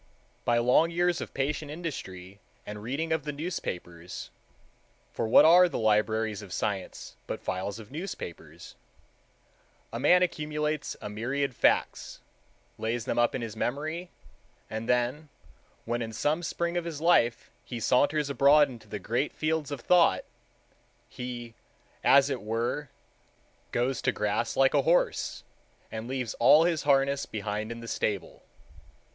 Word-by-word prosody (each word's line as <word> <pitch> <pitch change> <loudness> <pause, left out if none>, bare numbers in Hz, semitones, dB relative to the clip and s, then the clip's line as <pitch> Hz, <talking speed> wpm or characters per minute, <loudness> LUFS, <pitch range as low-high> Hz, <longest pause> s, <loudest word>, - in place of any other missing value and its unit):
By 120 - +3
long 125 +8 +4
years 175 +1 +1
of - - -6
patient 145 +2 -2
industry 100 - -7 0.3
and 105 0 -7
reading 145 +8 -2
of 160 -3 -1
the 150 - -3
newspapers—for 90 - -7
what 115 - +7
are 175 +2 +7
the - - -3
libraries 110 0 +1
of 100 -3 -11
science 95 -1 -4
but - - -4
files 95 +2 -3
of 110 0 -12
newspapers—a 145 - -11
man 180 +7 +5
accumulates 150 -3 -2
a - - -3
myriad 130 +5 -2
facts, - - +1 0.6
lays 115 +1 -2
them - - -1
up 120 - +2
in 125 - -3
his 110 -2 -6
memory, 155 +9 -3 0.6
and 110 +1 -4
then 125 +5 0 0.6
when 120 +1 -1
in 115 -1 -4
some 150 +9 0
spring 170 +1 -2
of 175 - -2
his 165 -4 -5
life 135 -8 +2
he 120 - -6
saunters 145 +6 +2
abroad 140 +1 +5
into 115 -4 -12
the 105 - -5
Great 120 +9 -1
Fields 155 -2 -1
of 145 -4 -5
thought, 175 +5 +4 0.9
he, 120 -2 -7 0.5
as 140 0 +6
it 125 - -3
were, 115 +6 -2 0.8
goes 125 +2 0
to - - +2
grass 105 0 -1
like 135 0 +4
a - - +4
horse - - +1 0.5
and 110 +1 -5
leaves 130 -3 -3
all 150 +7 +7
his 170 -2 +1
harness 140 0 +3
behind 105 +1 -4
in 115 0 -7
the 115 - -9
stable. 100 -6 -3
130 Hz, 140 wpm, -28 LUFS, 110-155 Hz, 0.9 s, what